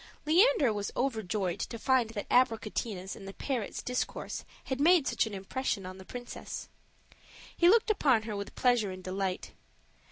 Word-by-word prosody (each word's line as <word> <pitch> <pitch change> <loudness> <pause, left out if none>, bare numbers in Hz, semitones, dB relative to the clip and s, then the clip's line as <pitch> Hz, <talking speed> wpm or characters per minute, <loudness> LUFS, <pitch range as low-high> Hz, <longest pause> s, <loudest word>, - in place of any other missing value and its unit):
Leander 325 - +5
was 205 -1 -2
overjoyed 215 -8 -1
to 230 - -4
find 250 -1 +2
that 215 -2 -5
Abricotina's 220 -5 +1
and 195 - -10
the 195 - -8
parrot's 250 -7 -3
discourse 250 0 -3 0.2
had 265 0 -3
made 335 -1 +6
such - - +1
an 210 - -6
impression 195 +1 -2
on 185 +1 -8
the 190 - -11
princess. 245 +3 -7 0.9
He 345 - +5
looked 445 +2 +5
upon 265 - +3
her 215 -1 -4
with 200 0 -6
pleasure 245 -5 +3
and 185 0 -8
delight. 190 0 -3
225 Hz, 160 wpm, -30 LUFS, 195-265 Hz, 0.9 s, made